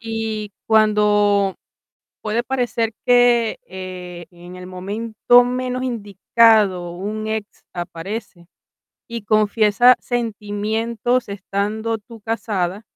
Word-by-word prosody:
Y 225 -2 -4 0.2
cuando 210 -2 +3 0.7
puede 220 +2 -1
parecer 240 -3 -1
que, 245 -2 +4
eh, 180 -2 -8
en 175 +1 -12
el 180 0 -9
momento 215 +6 +2
menos 250 +1 -2
indicado, 210 -4 +2
un 210 +4 -4
ex 220 -1 -5
aparece 175 +1 -6 0.6
y 235 -2 -5
confiesa 215 +3 +4
sentimientos 225 +1 -2
estando 205 +3 -2
tú 225 +2 -14
casada 205 -3 -2
215 Hz, 95 wpm, -20 LUFS, 200-230 Hz, 0.7 s, que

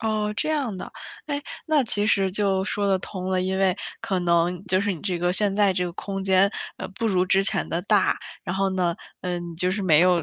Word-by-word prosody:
哦， 215 -1 0
这 270 - 0
样 280 -10 -1
的。 - - -7 0.4
诶， 290 -1 -3 0.2
那 305 -4 +3
其 210 -2 +3
实 195 -3 +2
就 195 -1 +1
说 205 0 -1
得 195 -1 +2
通 185 0 -6
了。 185 - +1
因 190 +1 -1
为 190 -2 +2 0.2
可 190 -2 -1
能 175 +1 +1
就 185 +1 +2
是 205 0 0
你 170 - -7
这 180 -3 -1
个 175 +1 +1
现 200 +1 +1
在 200 -1 +4
这 180 0 -1
个 175 - -4
空 195 +2 -5
间， 190 +1 +4 0.3
呃， - - -5
不 230 - -1
如 185 -3 +2
之 195 +1 +4
前 195 - +2
的 170 - -1
大。 205 0 +3 0.3
然 180 - -3
后 195 0 +1
呢， 180 -2 0 0.3
呃， 180 -1 -2
你 170 -1 -7
就 180 +2 0
是 200 +2 -2
没 160 -5 +5
有 180 -1 +4
190 Hz, 260 characters per minute, -24 LUFS, 180-205 Hz, 0.4 s, 没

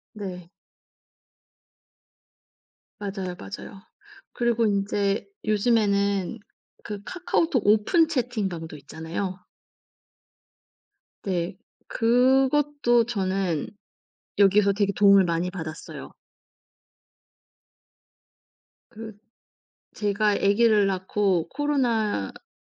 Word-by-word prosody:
네. 180 -4 -7 2.5
맞아요, 195 -3 -5
맞아요. 100 - -9 0.5
그리고 235 -1 +1
인제 200 0 0 0.2
요즘에는 205 -2 +1 0.4
그 210 -1 -6
카카오톡 330 - -1
오픈 220 - +4
채팅방도 210 - -3
있잖아요. 165 +6 -6 1.8
네. 180 -1 -2 0.3
그것도 260 +1 +3
저는 190 -7 -1 0.7
여기서 200 0 +4
되게 200 0 +1
도움을 200 0 +6
많이 170 0 -1
받았어요. 160 -4 -8 2.8
그 220 -2 -10 0.8
제가 210 0 +1
애기를 210 0 +3
낳고 190 -2 0
코로나가 240 - -1
205 Hz, 165 characters per minute, -25 LUFS, 190-230 Hz, 2.8 s, 도움을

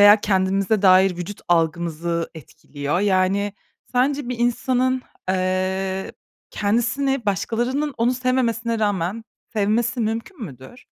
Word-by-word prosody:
veya 205 +1 +9
kendimize 195 +1 +1
dair 185 -1 +5
vücut 180 +3 -6
algımızı 170 0 0
etkiliyor? 145 +1 -4
Yani 195 0 +2 0.4
sence 265 +1 +1
bir 250 - -3
insanın, 250 +2 +1 0.3
eee, 190 +1 -1 0.4
kendisini 240 +4 0
başkalarının 240 - -1
onu 240 +2 +2
sevmemesine 235 -3 0
rağmen 205 +1 -1 0.3
sevmesi 225 +3 +1
mümkün 230 - -3
müdür? 135 - -12
205 Hz, 105 wpm, -22 LUFS, 185-240 Hz, 0.4 s, veya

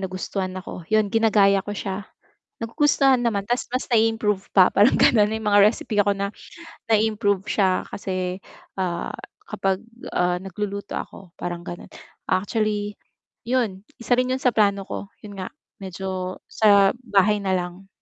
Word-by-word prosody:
nagustuhan 185 0 -4
ako, 185 -1 -7
yun 215 -2 +2
ginagaya 205 -3 +4
ko 205 - -6
siya. 195 +1 -5 0.5
Nagugustuhan 270 +1 +3
naman 215 -5 0
ta's 240 +4 -2
mas 255 +2 -2
nai-improve 220 -3 +1
pa 185 -2 +6
parang 205 +5 +5
ganun. 210 -3 +5
May 220 0 -3
mga 205 -1 +4
recipe 210 0 +3
ako 200 0 +2
na 200 +1 -3 0.6
nai-improve 210 -3 +2
siya 190 -3 +1
kasi, 185 -1 -3 0.4
ah, 175 -2 -2 0.3
kapag, 195 -1 -2 0.3
ah, 180 0 +2
nagluluto 200 +2 -5
ako, 180 -3 -8
parang 175 -1 -4
gano'n. 175 - -8 0.4
Actually, 205 +1 -1 0.5
yun 235 -7 0 0.2
isa 235 - -3
rin 250 0 +1
yun - - +1
sa 250 -3 +2
plano 200 -2 +2
ko, 200 - -5 0.2
yun 205 -1 -9
nga 185 - -4 0.3
medyo 185 0 -4
sa 200 -2 +5 0.2
bahay 205 +1 +4
na 195 -1 -1
lang. 180 +2 -6
200 Hz, 145 wpm, -23 LUFS, 190-215 Hz, 0.6 s, pa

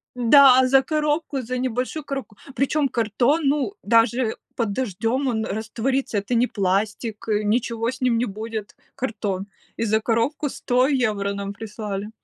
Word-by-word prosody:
Да, 260 +1 +7
за 270 +1 +5
коробку, 300 -1 -1
за 255 +1 -4
небольшую 255 +4 -2
коробку, 270 -7 -6 0.2
причем 280 +1 +1
картон, 240 +7 +1
ну 290 +7 +1
даже 230 0 +2 0.2
под 230 -4 -1
дождем 235 +4 -1
он 220 -3 -1
растворится, 225 +3 -2
это 205 +5 -2
не 240 +2 +3
пластик, 205 +3 -2
э, 215 -1 +1
ничего 230 +2 0
с 260 - -10
ним 250 -3 +2
не 240 - +1
будет, 215 0 -6 0.2
картон, 210 -7 -3 0.3
и - - -2
за 220 0 +2
коробку 235 +7 0
100 250 +1 +1
евро 215 -8 0
нам 200 0 -4
прислали. 210 -1 -5
230 Hz, 150 wpm, -23 LUFS, 215-260 Hz, 0.3 s, Да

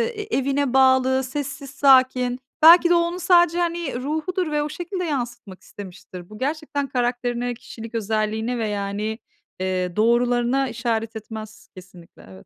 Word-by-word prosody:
eee, 420 - -4
e 420 -6 -2
evine 275 -1 0
bağlı, 260 0 +4
sessiz, 275 +1 -5
sakin. 255 -3 +3 0.2
Belki 345 +2 +8
de 350 - +5
onun 340 +1 0
sadece 350 -2 +4
hani 340 -5 -2
ruhudur 315 +4 -2
ve 295 0 0
o 295 - -4
şekilde 360 +4 -5
yansıtmak 240 - -5
istemiştir. 185 -2 -11
Bu 215 - -11
gerçekten 285 +1 -3
karakterine, 245 -1 -2
kişilik 230 0 -10
özelliğine 220 +2 -1
ve 225 -2 -2
yani, 205 +2 -3 0.4
eee, 185 -1 -2
doğrularına 240 +3 +2
işaret 230 -1 -3
etmez 215 0 -9
kesinlikle 180 -2 -15
evet. 95 0 -14
245 Hz, 145 wpm, -22 LUFS, 220-290 Hz, 0.4 s, Belki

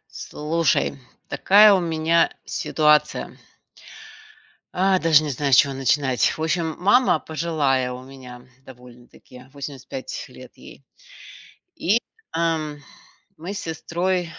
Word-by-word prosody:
Слушай, 150 -2 -1 0.3
такая 210 +2 +6
у 190 - +3
меня 165 0 +1
ситуация. 150 -1 0 1.4
А, 190 +1 +2
даже 160 -3 +4
не 150 - -3
знаю, 140 +1 -2
с 130 - +7
чего 140 -1 +4
начинать. 135 -1 +1
В - - -7
общем, 160 0 -1
мама, 205 0 +3
пожилая 150 -6 -1
у 125 +1 -8
меня, 125 -2 -13 0.2
довольно-таки, 125 0 -16
85 145 - -7
лет - - -14
ей. - - -14 1.0
И, 205 +7 +2 0.3
ам, 160 -3 -2 0.6
мы 175 +5 -7
с 205 - -5
сестрой, 175 +3 -2
155 Hz, 115 wpm, -22 LUFS, 135-170 Hz, 1.4 s, с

